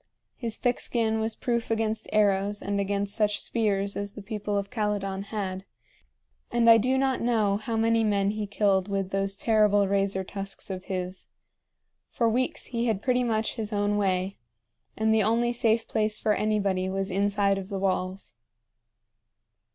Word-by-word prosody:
His 230 -3 -5
thick 245 -1 0
skin 220 -2 0
was 220 0 -1
proof 235 -2 -2
against 220 -1 -1
arrows 205 -1 +2
and 200 0 -1
against 200 0 -1
such 210 -2 +1
spears 200 -3 0
as 200 0 -4
the 210 - -9
people 210 -1 -3
of 200 0 -3
Calydon 200 -3 -2
had; 195 -3 -4 0.9
and 235 -1 +2
I 225 0 +9
do 255 +4 +1
not 265 -1 +1
know 220 -4 +2
how 225 +2 -3
many 225 0 +3
men 200 -2 +2
he 215 -1 -3
killed 200 -2 +1
with 195 -1 -2
those 195 0 0
terrible 210 -2 +3
razor 195 -1 +1
tusks 195 +1 -6
of 185 0 -6
his. 185 0 -4 0.8
For 235 - +1
weeks 250 +3 0
he 235 -1 -2
had 215 -3 -1
pretty 250 -1 +2
much 220 -2 0
his 215 -1 -4
own 205 0 +1
way, 190 -1 0 0.6
and 220 0 +2
the 220 - +4
only 230 +3 +2
safe 230 -1 +1
place 215 0 0
for 215 - +1
anybody 200 -3 0
was 195 0 -2
inside 200 0 +1
of 190 0 -8
the 200 - -3
walls. 185 -4 -2
205 Hz, 165 wpm, -27 LUFS, 195-225 Hz, 0.9 s, I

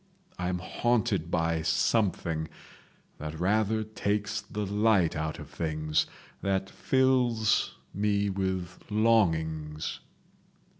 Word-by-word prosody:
I 90 0 -1
am 90 - 0
haunted 105 -2 0
by 80 -1 +1
something—that 80 -4 -2
rather 110 +4 +2
takes 105 -1 -1
the 105 0 -4
light 100 -3 +3
out 80 0 -2
of - - -9
things, 75 -1 0 0.3
that 95 0 0
fills 125 -5 +2 0.2
me 100 0 +1
with 95 -2 -2
longings 80 -9 +1
95 Hz, 95 wpm, -29 LUFS, 80-110 Hz, 0.3 s, light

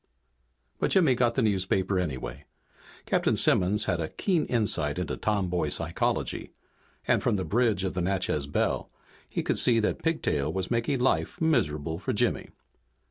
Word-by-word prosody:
But - - +1
Jimmy 165 -9 +4
got 120 -1 +1
the 130 - +2
newspaper 95 -2 +1
anyway. 70 -4 -4 0.6
Captain - - +1
Simmons 100 +4 +3
had 90 -2 0
a 80 - -3
keen 175 -6 0
insight 85 - 0
into 90 - -2
tomboy 90 -7 0
psychology, - - -2 0.5
and - - +3
from - - +1
the 95 -2 -2
bridge 110 0 +1
of 95 - -2
the 90 - -2
Natchez 90 -6 -1
Belle 70 - -1 0.4
he - - -2
could - - +1
see 115 -2 +3
that 105 - -1
Pigtail 155 - 0
was 95 +1 -3
making 120 +3 0
life 130 - 0
miserable 80 - 0
for 90 - -2
Jimmy. - - 0
95 Hz, 155 wpm, -27 LUFS, 85-120 Hz, 0.6 s, Jimmy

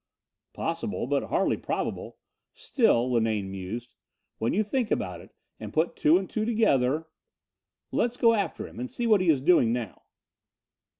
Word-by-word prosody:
"Possible, - - -3
but - - 0
hardly - - +1
probable. - - -4 0.4
Still," 130 - +2
Linane 110 -4 0
mused, 100 +6 -6 0.5
"when 115 - 0
you 215 - +2
think 230 +2 -1
about 90 - -2
it, - - -15 0.3
and - - -7
put 160 +2 0
two 155 +3 +4
and 190 0 -3
two 215 - -2
together.... 160 - +1 0.8
Let's 240 +1 0
go 230 -1 +5
after 205 -3 -2
him - - -12
and 125 +1 -4
see 240 - -3
what 215 -4 +4
he 180 - +1
is 145 -5 +3
doing 140 -7 +4
now." 120 -4 -4
155 Hz, 160 wpm, -27 LUFS, -, 0.8 s, go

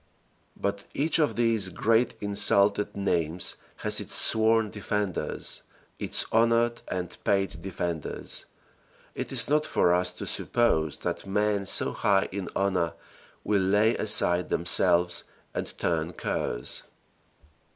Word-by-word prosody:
But 100 0 -2
each 155 +4 +1
of 150 - +2
these 115 -5 +1
great 115 +5 +1
insulted 100 0 +2
names 85 -3 -1 0.2
has - - +1
its - - -3
sworn 110 -1 +3
defenders, 105 -2 -3 0.4
its - - +2
honored 115 +1 +2
and 90 -2 -4
paid 95 -1 0
defenders. 85 -4 -5 0.7
It - - -5
is 120 -3 +3
not 150 +1 +2
for 90 -11 +2
us 90 0 +1
to - - -7
suppose 80 -11 0
that - - -4
men 105 0 0
so - - +4
high 100 -1 +2
in 95 0 -4
honor 95 -4 0 0.5
will 105 -2 +1
lay 105 +4 +3
aside 90 -4 +3
themselves 85 0 +2 0.3
and - - -5
turn 85 0 -1
curs. - - -3
100 Hz, 120 wpm, -27 LUFS, 90-110 Hz, 0.7 s, so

